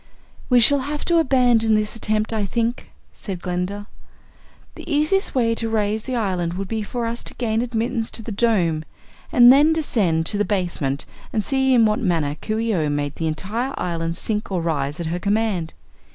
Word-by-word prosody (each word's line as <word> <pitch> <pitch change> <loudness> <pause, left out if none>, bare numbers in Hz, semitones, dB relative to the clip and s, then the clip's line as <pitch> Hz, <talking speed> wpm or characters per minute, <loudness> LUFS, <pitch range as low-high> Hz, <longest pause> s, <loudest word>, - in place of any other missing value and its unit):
"We 250 -1 +6
shall 280 +5 +5
have 290 +3 -4
to 340 -1 +3
abandon 245 -6 +3
this 215 +1 -1
attempt, 215 0 -1
I 215 -2 0
think," 230 +5 -2 0.2
said 190 -4 -6
Glinda. 180 +3 -3 0.9
"The - - -9
easiest 305 +6 +1
way 230 -3 +2
to 230 0 -2
raise 215 0 -1
the 255 - -3
island 180 -6 -1
would 195 +1 -4
be 220 +1 -2
for 235 +3 -4
us 230 +1 -4
to - - -5
gain 225 -2 0
admittance 235 -1 -2
to 225 - -9
the 225 - -6
Dome 190 -8 +1 0.5
and 245 0 +8
then 295 +4 +5
descend 195 - 0
to 205 - +3
the - - +3
basement 175 -9 -2 0.3
and 215 - -1
see 265 +1 +2
in 230 -2 +5
what 215 0 +1
manner 165 -8 0
Coo 215 0 -2
ee 225 0 0
oh 155 -5 0
made 145 0 -2
the 165 - -1
entire 220 +12 -3
island 165 -1 -2
sink 210 -2 -3
or 185 - 0
rise 150 -3 -2
at 170 - -3
her 170 +2 -2
command. 200 -5 -1
215 Hz, 195 wpm, -22 LUFS, 175-240 Hz, 0.9 s, and